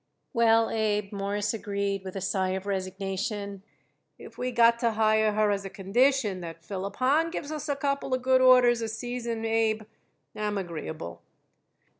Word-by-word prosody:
"Well, 225 Hz, -1 st, +4 dB
Abe," 210 Hz, -2 st, 0 dB
Morris 205 Hz, +1 st, -2 dB
agreed, 200 Hz, -2 st, -2 dB
with 190 Hz, 0 st, -7 dB
a 195 Hz, -, -3 dB
sigh 190 Hz, 0 st, 0 dB
of 190 Hz, 0 st, -4 dB
resignation, 195 Hz, +1 st, -3 dB, 0.6 s
"if -, -, -12 dB
we 250 Hz, -, -2 dB
got 235 Hz, -1 st, +4 dB
to 235 Hz, -2 st, +1 dB
hire 220 Hz, 0 st, +3 dB
her 210 Hz, 0 st, +2 dB
as 200 Hz, -1 st, -1 dB
a 195 Hz, -, -6 dB
condition 210 Hz, +1 st, +1 dB
that 165 Hz, -1 st, -8 dB
Philip 195 Hz, +1 st, -5 dB
Hahn 295 Hz, +6 st, +2 dB
gives 310 Hz, -3 st, -5 dB
us 305 Hz, -1 st, -5 dB
a 285 Hz, -, +1 dB
couple 275 Hz, -1 st, -1 dB
of 255 Hz, -, -5 dB
good 260 Hz, 0 st, +4 dB
orders 250 Hz, -2 st, +6 dB
a 225 Hz, -, -2 dB
season, 230 Hz, 0 st, -4 dB
Abe, 225 Hz, -1 st, +1 dB, 0.5 s
I'm 210 Hz, -1 st, -2 dB
agreeable." 155 Hz, -, -6 dB
215 Hz, 165 wpm, -27 LUFS, 195-240 Hz, 0.6 s, orders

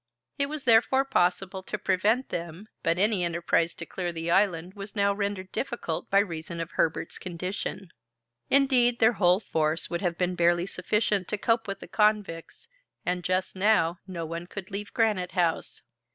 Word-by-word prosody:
It 280 Hz, -, +2 dB
was, 300 Hz, -1 st, -5 dB
therefore, 255 Hz, +3 st, +4 dB
possible 190 Hz, -5 st, +1 dB
to 210 Hz, -, -5 dB
prevent 215 Hz, +7 st, +1 dB
them, 170 Hz, +4 st, -5 dB
but 165 Hz, +1 st, +1 dB
any 205 Hz, -1 st, +2 dB
enterprise 170 Hz, 0 st, +1 dB
to 170 Hz, -, -7 dB
clear 175 Hz, +1 st, -3 dB
the 165 Hz, 0 st, -3 dB
island 180 Hz, -2 st, +2 dB
was 200 Hz, 0 st, -9 dB
now 200 Hz, -1 st, +3 dB
rendered 200 Hz, -2 st, -3 dB
difficult 240 Hz, -11 st, -3 dB
by 195 Hz, -, +3 dB
reason 170 Hz, -4 st, -1 dB
of 165 Hz, +1 st, -4 dB
Herbert's 165 Hz, +1 st, -1 dB
condition. 185 Hz, +1 st, -5 dB, 0.6 s
Indeed, 255 Hz, -3 st, +4 dB
their 225 Hz, +1 st, +5 dB
whole 180 Hz, -2 st, +4 dB
force 160 Hz, -5 st, -1 dB
would 170 Hz, -, -2 dB
have 175 Hz, -3 st, -1 dB
been 180 Hz, 0 st, 0 dB
barely 175 Hz, 0 st, +2 dB
sufficient 200 Hz, 0 st, 0 dB
to 210 Hz, -, -2 dB
cope 225 Hz, +2 st, +1 dB
with 195 Hz, 0 st, -5 dB
the -, -, -9 dB
convicts, 210 Hz, -, 0 dB, 0.4 s
and 180 Hz, 0 st, -1 dB
just 185 Hz, +2 st, -1 dB
now 185 Hz, -4 st, +2 dB
no 170 Hz, -3 st, -4 dB
one 170 Hz, +2 st, -5 dB
could 195 Hz, +1 st, -8 dB
leave 205 Hz, +1 st, -5 dB
Granite 210 Hz, -6 st, +1 dB
House. 175 Hz, -3 st, -1 dB
185 Hz, 170 wpm, -27 LUFS, 170-210 Hz, 0.6 s, their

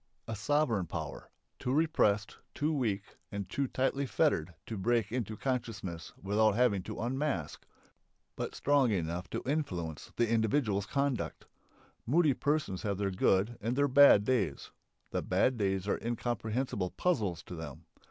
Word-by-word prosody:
A 115 Hz, -, -3 dB
sovereign 115 Hz, -, +1 dB
power, -, -, -6 dB, 0.3 s
too 125 Hz, -, -2 dB
repressed, 130 Hz, -9 st, +2 dB, 0.2 s
too 150 Hz, +2 st, 0 dB
weak, 105 Hz, -8 st, -2 dB
and 100 Hz, -2 st, -4 dB
too 135 Hz, +8 st, -1 dB
tightly 135 Hz, +2 st, 0 dB
fettered 90 Hz, -, +1 dB
to 110 Hz, -, -5 dB
break 110 Hz, +1 st, +1 dB
into 110 Hz, -3 st, -3 dB
consciousness 110 Hz, -10 st, -3 dB
without 105 Hz, +1 st, +2 dB
having 115 Hz, -5 st, +3 dB
to 110 Hz, +3 st, -7 dB
unmask, 125 Hz, -, -2 dB, 0.7 s
but -, -, -4 dB
strong 140 Hz, -3 st, +3 dB
enough 90 Hz, -2 st, -2 dB
to -, -, -4 dB
influence 90 Hz, -, -3 dB
the 120 Hz, -, +2 dB
individual's 110 Hz, -2 st, +1 dB
conduct. 140 Hz, -4 st, -1 dB, 0.6 s
Moody 155 Hz, +2 st, +4 dB
persons 145 Hz, -9 st, -1 dB
have 100 Hz, -2 st, -1 dB
their 100 Hz, -1 st, 0 dB
good 95 Hz, +5 st, +2 dB
and 115 Hz, +4 st, -1 dB
their 145 Hz, +1 st, +3 dB
bad 140 Hz, -6 st, +7 dB
days. 105 Hz, -, 0 dB, 0.4 s
The -, -, -1 dB
bad 130 Hz, -, +2 dB
days 95 Hz, -3 st, 0 dB
are -, -, 0 dB
incomprehensible 115 Hz, -3 st, -2 dB
puzzles 105 Hz, -, 0 dB
to -, -, -9 dB
them. 80 Hz, -5 st, -8 dB
110 Hz, 145 wpm, -32 LUFS, 95-135 Hz, 0.7 s, bad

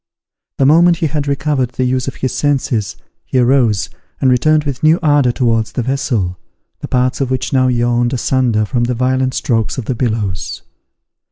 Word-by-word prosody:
The 135 Hz, -, +2 dB
moment 170 Hz, +4 st, +5 dB
he 170 Hz, -, -1 dB
had 145 Hz, -1 st, -2 dB
recovered 140 Hz, -3 st, -1 dB
the 130 Hz, -, -1 dB
use 130 Hz, 0 st, -1 dB
of 135 Hz, -, -4 dB
his 130 Hz, -, -3 dB
senses, 130 Hz, -7 st, -1 dB, 0.3 s
he -, -, -3 dB
arose, 120 Hz, -4 st, +2 dB, 0.3 s
and 130 Hz, -2 st, +3 dB
returned 155 Hz, +5 st, +3 dB
with 140 Hz, -4 st, -4 dB
new 155 Hz, +2 st, +4 dB
ardour 145 Hz, -5 st, +3 dB
towards 115 Hz, -3 st, 0 dB
the 125 Hz, -, -2 dB
vessel, 115 Hz, -9 st, -2 dB, 0.4 s
the -, -, -6 dB
parts 125 Hz, +1 st, 0 dB
of 135 Hz, -, -1 dB
which 130 Hz, 0 st, -2 dB
now 130 Hz, -1 st, +3 dB
yawned 120 Hz, 0 st, +1 dB
asunder 125 Hz, -4 st, 0 dB
from 120 Hz, +2 st, -1 dB
the 125 Hz, 0 st, -2 dB
violent 130 Hz, +1 st, 0 dB
strokes 115 Hz, -3 st, -1 dB
of 130 Hz, -, -4 dB
the 130 Hz, -, -1 dB
billows. 110 Hz, -7 st, -3 dB
130 Hz, 180 wpm, -16 LUFS, 120-135 Hz, 0.4 s, moment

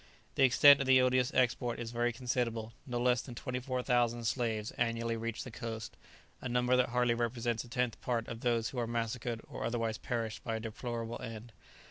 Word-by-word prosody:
The -, -, -1 dB
extent 140 Hz, +2 st, +8 dB
of 135 Hz, -, -1 dB
the 130 Hz, 0 st, +7 dB
odious 125 Hz, -1 st, +3 dB
export 120 Hz, -1 st, +1 dB
is 115 Hz, -1 st, -4 dB
very 120 Hz, 0 st, +1 dB
considerable; 115 Hz, -2 st, -2 dB
no 120 Hz, -2 st, -2 dB
less 125 Hz, 0 st, +3 dB
than 120 Hz, -2 st, -9 dB
24,000 125 Hz, -2 st, 0 dB
slaves 110 Hz, -3 st, -1 dB
annually 115 Hz, 0 st, -1 dB
reach 115 Hz, 0 st, -3 dB
the 125 Hz, -, -8 dB
coast, 110 Hz, -1 st, -6 dB, 0.5 s
a 130 Hz, -, -4 dB
number 125 Hz, +1 st, +3 dB
that 125 Hz, -1 st, +3 dB
hardly 125 Hz, 0 st, +2 dB
represents 120 Hz, -1 st, -1 dB
a 120 Hz, -, -14 dB
tenth 125 Hz, -1 st, -1 dB
part 120 Hz, -2 st, -1 dB
of 115 Hz, -, -6 dB
those 115 Hz, -2 st, +1 dB
who 135 Hz, -, -4 dB
are 120 Hz, -, -1 dB
massacred 115 Hz, 0 st, -2 dB
or -, -, -6 dB
otherwise 115 Hz, -2 st, -1 dB
perish 115 Hz, -3 st, -3 dB
by 115 Hz, -, -3 dB
a -, -, -2 dB
deplorable 115 Hz, +1 st, -5 dB
end. 115 Hz, -1 st, -7 dB
120 Hz, 190 wpm, -33 LUFS, 115-125 Hz, 0.5 s, extent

